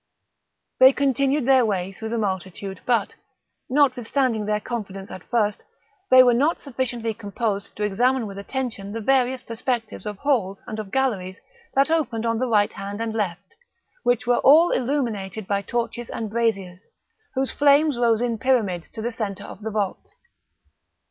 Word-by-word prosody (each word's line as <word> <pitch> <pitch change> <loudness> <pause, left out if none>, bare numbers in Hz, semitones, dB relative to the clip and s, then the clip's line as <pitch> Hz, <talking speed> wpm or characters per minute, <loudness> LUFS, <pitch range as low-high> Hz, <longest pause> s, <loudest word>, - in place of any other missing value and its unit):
They 260 +1 +8
continued 275 0 +1
their 265 -1 +5
way 195 -4 -1
through 220 +3 -7
the 235 - -2
multitude 190 -1 -4
but, 235 -5 +1 0.6
notwithstanding 255 -4 +1
their 210 0 +1
confidence 200 -4 -6
at 185 - -8
first, 215 -4 0 0.5
they 255 0 +9
were 245 -1 +5
not 290 +8 +2
sufficiently 240 -4 -3
composed 205 -1 -3
to 210 - -3
examine 240 +5 +1
with 200 -1 -7
attention 215 -3 -4
the 230 - -3
various 260 +2 +1
perspectives 230 -1 -3
of 210 -1 -5
halls 210 -8 0
and 220 - -6
of 210 -2 -6
galleries 205 -9 -1 0.4
that 275 +3 +3
opened 255 -9 0
on 230 -1 0
the 255 - 0
right 210 -3 +2
hand 200 +1 -6
and 225 -1 -2
left, 195 -3 -3 0.5
which 245 0 +1
were 245 0 +3
all 315 +5 +6
illuminated 225 -7 -2
by 200 +1 0
torches 235 +2 -3
and 220 -2 -4
braziers, 200 -6 -1 0.6
whose 265 0 0
flames 290 0 +4
rose 235 -1 +2
in 230 -2 -1
pyramids 215 -10 0
to 220 - -6
the 240 - -1
centre 205 -3 -4
of 195 - -10
the 220 - -3
vault. 205 -3 -3
230 Hz, 160 wpm, -23 LUFS, 200-255 Hz, 0.6 s, they